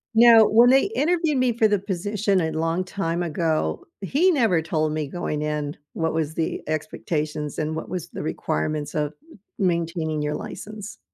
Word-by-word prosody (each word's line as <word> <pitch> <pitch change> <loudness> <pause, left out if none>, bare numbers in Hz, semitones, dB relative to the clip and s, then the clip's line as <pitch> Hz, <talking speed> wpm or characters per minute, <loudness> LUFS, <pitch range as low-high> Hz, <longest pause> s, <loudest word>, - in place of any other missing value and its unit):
Now, 230 -1 +8
when 235 +3 +6
they 270 - +5
interviewed 325 -2 +1
me 255 -2 +2
for 225 -2 +4
the 205 - +2
position 200 +1 0
a 160 -1 -1
long 165 +3 0
time 175 -2 -2
ago, 160 - -1 0.2
he 305 - +3
never 225 - +3
told 155 -1 -1
me 155 -2 -2
going 150 -1 -3
in 150 -1 -2 0.2
what 160 -1 -1
was 160 -1 -1
the 160 0 -2
expectations 155 -1 -3
and 155 0 -1
what 160 - -5
was 180 -2 -4
the - - -6
requirements 155 -1 -2
of 150 0 -1 0.5
maintaining 165 -4 0
your 150 0 -1
license. 210 0 -8
165 Hz, 165 wpm, -24 LUFS, 155-210 Hz, 0.5 s, Now